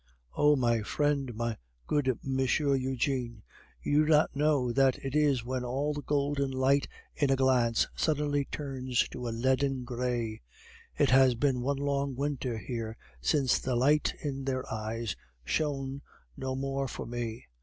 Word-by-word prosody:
Oh! 150 0 +5
my 120 -4 +2
friend, 140 +1 0
my 115 0 -2 0.3
good 130 -5 +1
Monsieur 135 +2 +1
Eugene, 130 -3 -1 0.4
you 150 +1 +3
do 155 - -1
not 150 -2 +4
know 145 -4 +2
that 135 -1 +3
it 135 - -3
is 145 -5 +2
when 130 0 -2
all 135 +5 -1
the 145 - -4
golden 140 -1 0
light 135 +2 +2 0.3
in 145 - +1
a 135 - +4
glance 125 -3 +3
suddenly 145 -2 +1
turns 130 -4 -1
to 125 - -6
a - - -1
leaden 130 +3 +1
gray. 120 - -2 0.6
It - - +3
has 130 -1 +6
been 130 0 +1
one 140 +2 0
long 140 -1 -1
winter 135 -3 -2
here 115 -1 -5 0.2
since 130 - +2
the 130 -1 -1
light 145 +5 +3
in 135 -2 -3
their 130 -1 -1
eyes 110 -2 -3 0.3
shone 140 -2 -1 0.3
no 130 0 -3
more 135 0 -2
for - - -6
me. 120 -1 -5
130 Hz, 155 wpm, -30 LUFS, 125-140 Hz, 0.6 s, has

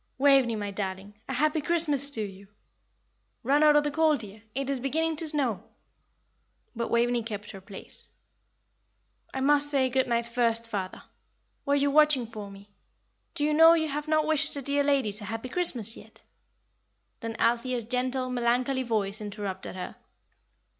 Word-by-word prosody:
Waveney, 270 -4 +4
my 205 -1 -4
darling, 195 0 -5 0.2
'a 265 - -2
happy 305 +3 +1
Christmas 295 -4 +2
to 235 -6 -1
you!' 195 -1 -9 1.0
Run 280 +5 +3
out 300 -1 +6
of 295 - +5
the 295 - -1
cold, 310 -2 +2
dear, 210 0 -10
it 275 0 -2
is 275 -2 -1
beginning 320 +5 -1
to 325 - -1
snow." 275 -9 -1 1.1
But 235 0 -3
Waveney 240 +1 +2
kept 210 -2 -6
her 195 - -10
place. 195 +1 -8 1.2
"I 265 - -4
must 290 +1 +4
say 270 -3 +2
good 260 +1 +1
night 235 -1 0
first, 230 -1 0
father. 195 -4 -5 0.6
Were 280 - +3
you 285 0 +2
watching 300 -4 +4
for 215 -3 -8
me? 200 +1 -14 0.6
Do 290 - -1
you 300 0 +2
know 325 +2 +8
you 315 -2 0
have 295 +2 -4
not 310 0 +2
wished 310 -1 +1
the 280 - -5
dear 285 +2 +1
ladies 260 -8 0
a - - -7
happy 225 +4 -5
Christmas 245 - +1
yet?" - - -15 1.0
Then 230 -1 -5
Althea's 240 +1 0
gentle, 255 +2 -1
melancholy 250 +2 +1
voice 215 -3 -1
interrupted 205 -3 -6
her. 185 - -7
255 Hz, 165 wpm, -27 LUFS, 220-290 Hz, 1.2 s, know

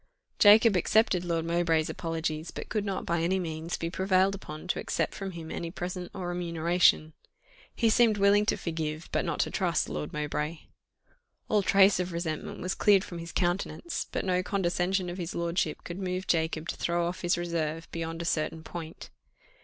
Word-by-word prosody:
Jacob 215 +1 +7
accepted 185 0 +3
Lord 165 -2 -1
Mowbray's 165 -2 +1
apologies, 165 -1 -3
but - - -7
could 215 - -1
not 195 -2 -3
by 170 -1 0
any 180 +3 +1
means 165 -1 -3
be 165 0 -3
prevailed 190 +1 +2
upon 155 -4 -8
to - - 0
accept - - -1
from 195 -1 -5
him 165 -2 -7
any 170 - -4
present 180 0 -5
or 180 -2 -5
remuneration. 170 -2 +2 0.6
He 230 - +2
seemed 225 -1 +4
willing 205 +1 +4
to - - +2
forgive, 160 -1 -4
but - - +1
not - - -3
to - - -1
trust - - 0
Lord 75 0 -4
Mowbray. 150 +2 -3 0.9
All 210 -1 +3
trace 195 0 +5
of 180 -1 -2
resentment 165 -2 -4
was 185 +2 -1
cleared 200 -2 +4
from 175 - -7
his 170 +1 -7
countenance, 185 - -2
but - - -2
no 180 -1 +2
condescension 185 0 0
of 175 +2 -5
his 170 -1 -4
lordship 170 -2 -1
could 175 +2 -6
move 185 0 -3
Jacob 160 -1 0
to - - -2
throw 170 0 0
off 180 +2 -4
his 175 -1 +1
reserve 165 -2 -2
beyond 165 0 -4
a - - -6
certain 160 0 -1
point. 165 0 -8
175 Hz, 185 wpm, -29 LUFS, 165-190 Hz, 0.9 s, Jacob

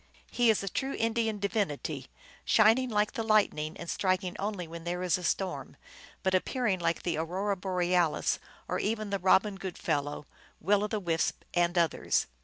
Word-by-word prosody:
He 240 -1 +3
is 215 -2 +3
a - - -4
true 270 +8 -2
Indian 225 -1 0
divinity, 160 - -2 0.4
shining 225 +4 +4
like 210 -1 +1
the - - -3
lightning 205 -8 +2
and 170 - -8
striking 185 0 0
only 195 -4 -3
when 165 0 -8
there 175 +1 -3
is 180 - +2
a - - -8
storm, 185 +2 -2 0.5
but 190 -1 +1
appearing 200 +1 +1
like 170 -1 -1
the 170 -3 -1
Aurora 185 +5 -1
Bo 190 +1 -6
realis, 180 -3 +1 0.3
or - - -1
even 215 -1 -2
the 200 - 0
Robin 195 +2 +3
Goodfellow 150 -6 -3 0.3
Will 205 +3 +2
o - - 0
the 215 0 -2
Wisp 165 -4 -1
at 175 0 +2
others. 170 -2 +2
190 Hz, 175 wpm, -30 LUFS, 170-210 Hz, 0.5 s, shining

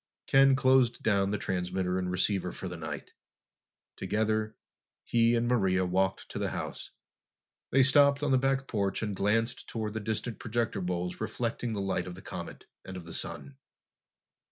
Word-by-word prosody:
Ken 135 0 +6
closed 130 -2 +3
down 100 -3 +2
the 105 - 0
transmitter 90 -1 -1
and 90 -1 -2
receiver 90 0 0
for 95 - -6
the 90 - -6
night. 80 -2 -7 0.8
Together, 110 0 -1 0.5
he 115 0 +3
and 120 0 +1
Maria 95 -6 +2
walked 95 +1 0
to - - -5
the - - -1
house. - - -5 0.8
They 135 0 +5
stopped 140 +1 +5
on 145 - +1
the 130 - +5
back 135 0 +1
porch 100 -2 -1
and 105 -2 -2
glanced 115 +5 0
toward 110 -2 -3
the 110 - -2
distant 110 +2 -3
projector 115 -3 -1
bowls 90 0 -3
reflecting 120 -1 -2
the 100 - -2
light 95 -2 -1
of 90 - -6
the 95 - -11
comet - - -7 0.2
and 95 0 -7
of 90 - -9
the 85 - -8
sun. 140 -1 -5
105 Hz, 170 wpm, -30 LUFS, 95-120 Hz, 0.8 s, Ken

